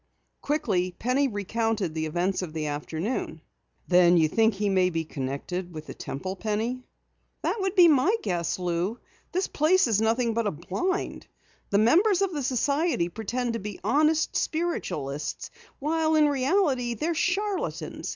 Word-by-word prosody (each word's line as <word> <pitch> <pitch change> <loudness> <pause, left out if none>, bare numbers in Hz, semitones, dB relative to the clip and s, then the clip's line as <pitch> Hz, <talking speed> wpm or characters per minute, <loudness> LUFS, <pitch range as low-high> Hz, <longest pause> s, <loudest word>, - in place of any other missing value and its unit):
Quickly 200 - 0
Penny 255 +4 +1
recounted 215 -3 -1
the 160 0 -2
events 180 +5 -1
of 170 -4 -6
the 155 -1 -3
afternoon. 160 - -3 0.5
"Then 175 -1 +5
you 160 -2 +4
think 220 +6 +2
he 205 +1 -1
may 185 -2 +3
be 165 -2 -2
connected 155 +6 -5
with 155 0 -7
the - - -8
Temple, 185 +8 -5
Penny?" 220 +5 -2 0.6
"That 440 - -1
would 385 0 -1
be 355 -2 +8
my 305 - +4
guess. 170 -1 -1
Lou, 180 +4 -1 0.3
this 370 +1 0
place 335 +5 +3
is 220 -4 +2
nothing 230 +1 +1
but 230 -1 0
a - - +1
blind. 195 - -3 0.4
The 200 - +2
members 360 - +4
of 380 -2 -1
the 295 - -2
society 275 - +1
pretend 230 +5 -3
to 230 - -2
be 205 0 -7
honest 305 +8 +2
spiritualists, 155 - -2 0.3
while 315 +2 +1
in 305 -1 +5
reality 270 -3 +1
they're 320 +9 -1
charlatans. 390 +4 -2
225 Hz, 155 wpm, -26 LUFS, -, 0.6 s, be